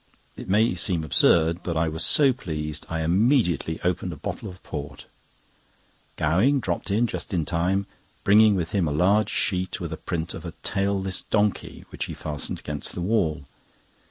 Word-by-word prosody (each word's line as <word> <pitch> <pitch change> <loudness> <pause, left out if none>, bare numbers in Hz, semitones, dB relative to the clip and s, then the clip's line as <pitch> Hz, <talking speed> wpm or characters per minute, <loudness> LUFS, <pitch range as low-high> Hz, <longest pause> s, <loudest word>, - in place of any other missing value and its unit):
It - - -9
may 105 +3 +3
seem 90 -2 0
absurd, 80 +3 +3
but 85 -2 -3
I 80 +1 +2
was 80 +1 -2
so 140 -3 +4
pleased, 75 - -5
I 80 0 -2
immediately 90 - +2
opened 90 0 -1
a - - -6
bottle - - -5
of 90 -1 -13
port. 70 -1 -7 1.1
Gowing 95 - +2
dropped 90 -4 -3
in 110 +5 +2
just 110 -3 -4
in 80 -3 0
time, 90 +5 0 0.4
bringing 105 +1 +6
with 85 -3 -2
him 95 -5 +1
a - - -1
large 100 +7 +3
sheet, 95 -2 -1
with - - -4
a - - -5
print 85 -1 -4
of - - -8
a - - -6
tailless 95 -1 0
donkey, 105 -2 -1
which - - -4
he - - -7
fastened 75 -2 -4
against 75 -1 -5
the 90 - -4
wall. 85 -8 0
90 Hz, 175 wpm, -25 LUFS, 80-100 Hz, 1.1 s, bringing